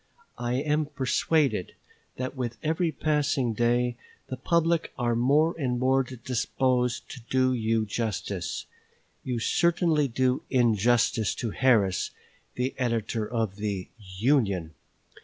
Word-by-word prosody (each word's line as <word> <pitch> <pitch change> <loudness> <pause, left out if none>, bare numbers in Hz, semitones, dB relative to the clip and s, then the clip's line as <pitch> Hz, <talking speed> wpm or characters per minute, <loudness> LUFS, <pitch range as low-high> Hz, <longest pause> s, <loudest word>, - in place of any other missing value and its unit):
I 120 0 -1
am 150 +3 0
persuaded 145 - 0 0.4
that 130 +1 -4
with 120 -3 -4
every 160 +2 +1
passing 145 -6 0
day 120 +1 +1 0.3
the 130 - -3
public 165 +5 +1
are 120 -2 +1
more 145 +7 +3
and 125 -4 0
more 130 +2 +3
disposed 125 0 -1
to 130 - -9
do 130 0 +3
you 110 -2 +1
justice. 100 -4 -3 0.6
You 125 -2 -2
certainly 165 +3 +2
do 130 +1 +1
injustice 115 -3 +2
to 115 - -3
Harris, 110 -8 +2 0.5
the 125 +2 -1
editor 115 -3 -1
of 110 -5 -1
the 100 -3 -3 0.3
"Union." 100 - +1
125 Hz, 120 wpm, -27 LUFS, 115-135 Hz, 0.6 s, more